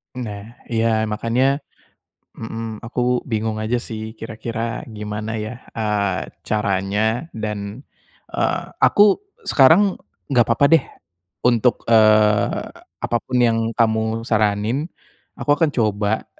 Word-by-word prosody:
Nah. 110 -3 -6 0.2
Iya, 110 -1 +1
makanya 120 +6 +1 0.8
mhm, 115 -1 -6
aku 125 +1 0
bingung 110 -1 -1
aja 110 +3 0
sih 110 -1 -6
kira-kira 115 +1 -4
gimana 105 0 -5
ya, 110 +3 -6 0.2
eee, 105 -3 -1
caranya? 105 - -1
Dan, 105 +1 -5 0.5
eee, - - 0 0.2
aku 205 - +5 0.2
sekarang 170 +9 +5 0.3
enggak 125 -5 +3
apa-apa 115 +5 +4
deh 160 -4 +5 0.6
untuk, 120 0 +2
eee, 110 -2 +4 0.4
apapun 120 +2 -1
yang 115 -2 +3 0.2
kamu 110 0 +1
saranin, 110 - 0 0.5
aku - - -6
akan 165 -1 +3
coba 105 -2 0
110 Hz, 105 wpm, -21 LUFS, 105-120 Hz, 0.8 s, aku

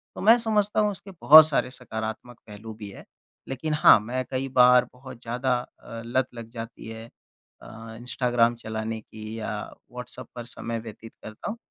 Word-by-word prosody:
तो - - -7
मैं 225 +4 +7
समझता 215 -3 +1
हूँ 210 -1 +2
उसके 195 0 -10
बहुत 155 +1 +10
सारे 135 -4 0
सकारात्मक 110 -1 -6
पहलू 110 +1 -9
भी 105 -2 -9
हैं। - - -12 0.4
लेक़िन 150 +4 -3
हाँ, 150 - +7
मैं 125 +4 -3
कई 130 +1 -2
बार 125 0 +6
बहुत 125 -1 -12
ज़्यादा 125 +2 -1
अ, 115 -1 -10
लत 130 +2 0
लग 115 -1 -9
जाती 115 -1 -9
है 115 0 -8 0.6
अ, 115 0 -11
इंस्टाग्राम 120 -1 +1
चलाने 110 -1 -5
की 110 +1 -9
या 110 - -4 0.4
व्हाट्सएप 125 0 -8
पर 120 -1 -7
समय 115 -1 -5
व्यतीत 110 0 -11
करता 110 - -7
हूँ 230 - -5
120 Hz, 175 wpm, -25 LUFS, 110-130 Hz, 0.6 s, बहुत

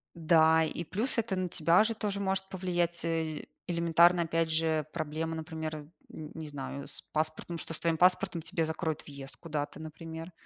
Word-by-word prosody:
Да, 160 -1 +5
и 160 +2 -2
плюс 220 - -1
это 230 -3 +1
на 185 -1 -1
тебя 170 +5 +4
же 225 +1 -1
тоже 205 -2 -2
может 190 -1 0
повлиять, 175 -2 -1
э 160 -2 -1 0.2
элементарно, 170 0 +4
опять 165 0 0
же, 160 -1 +1
проблемы, 160 0 -3
например, 160 -1 -4
э, - - -5 0.3
н 155 -1 -7
не 160 -1 -6
знаю, 140 0 -5
с - - -1
паспортом, 155 +2 -1
что 165 - -4
с - - 0
твоим 165 -1 +2
паспортом 180 -1 +3
тебе 165 0 -1
закроют 160 -1 -2
въезд 140 -2 -7
куда-то, 150 -3 -4
например. 160 +2 -7
165 Hz, 180 wpm, -31 LUFS, 155-175 Hz, 0.3 s, Да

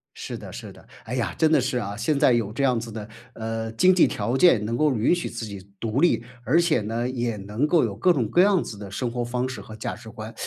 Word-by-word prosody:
是 - - -6
的， - - -10
是 - - -8
的， - - -17 0.2
哎 125 - -4
呀， 110 -8 -1
真 160 - +4
的 150 - +5
是 125 0 -1
啊， 100 -4 -3
现 115 +7 0
在 125 - +5
有 115 -4 0
这 125 +6 -2
样 130 -3 +3
子 115 0 -7
的， 105 -1 -7 0.3
呃， 115 0 -4
经 185 +11 +4
济 180 - +6
条 120 - -2
件 135 - +5
能 115 +2 -2
够 150 +1 +2
允 115 +8 +2
许 175 - -4
自 115 - -5
己 100 -2 -10
独 115 +4 -1
立。 175 -8 +3 0.2
而 140 +7 +3
且 170 -8 +2
呢， 115 +4 -2
也 120 -4 -2
能 105 +7 -2
够 160 +1 +3
有 105 -4 -4
各 150 - +3
种 130 -10 +1
各 175 - +4
样 195 -2 +4
子 105 - -8
的 100 -2 -9
生 120 +4 -2
活 120 +1 -3
方 125 +1 -2
式 120 -5 -6
和 110 - -11
价 110 - -4
值 110 +1 -12
观， 110 +1 -8
120 Hz, 290 characters per minute, -24 LUFS, 110-135 Hz, 0.3 s, 济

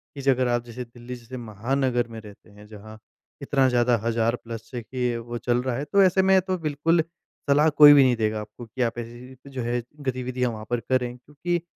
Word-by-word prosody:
कि 140 - -6
ज 135 - -8
अगर 130 -1 +3
आप 120 -1 0
जैसे 120 +1 -7
दिल्ली 120 +1 -10
जैसे 120 +1 -10
महानगर 120 +3 -1
में 115 -1 -9
रहते 105 0 -15
हैं 105 +1 -15
जहाँ 110 0 -12 0.4
इतना 135 -1 +2
ज़्यादा 120 0 +3
हज़ार 115 0 +1
प्लस 115 -2 -9
देखिए 125 0 -2
वो 120 +1 -6
चल 120 +1 0
रहा 130 -2 -1
है, 140 - -3
तो 200 +7 +3
ऐसे 190 0 +4
में 190 0 +5
तो 185 0 -2
बिल्कुल 160 +1 +1 0.5
सलाह 150 +3 +5
कोई 150 -1 +9
भी 140 - +7
नहीं 125 -2 +3
देगा 110 -1 -1
आपको 105 +3 -10
कि 120 +3 -6
आप 115 -1 0
ऐसी 120 +1 -8
जी 130 +2 -14
जो 130 -2 -4
है 120 +1 -1 0.2
गतिविधियाँ 125 -2 -2
वहाँ 110 -1 -8
पर 120 - 0
करें। 125 0 -1
क्योंकि 150 +7 -3
125 Hz, 220 wpm, -25 LUFS, 115-135 Hz, 0.5 s, कोई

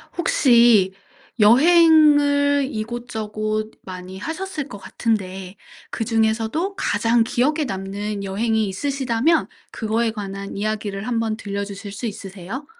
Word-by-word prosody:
혹시 235 - +4 0.5
여행을 285 +2 +5
이곳저곳 215 -1 -4
많이 185 0 -8
하셨을 320 - -5
것 - - -8
같은데 190 -4 -3 0.4
그중에서도 225 - 0
가장 230 - +2
기억에 295 +7 0
남는 200 +1 -4
여행이 220 +2 0
있으시다면 270 - 0 0.2
그거에 225 +1 -1
관한 200 -2 -6
이야기를 210 0 -3
한번 225 -2 -1
들려 200 -1 -4
주실 200 0 -8
수 200 +5 -6
있으세요? 200 +5 -7
220 Hz, 270 characters per minute, -21 LUFS, 200-265 Hz, 0.5 s, 여행을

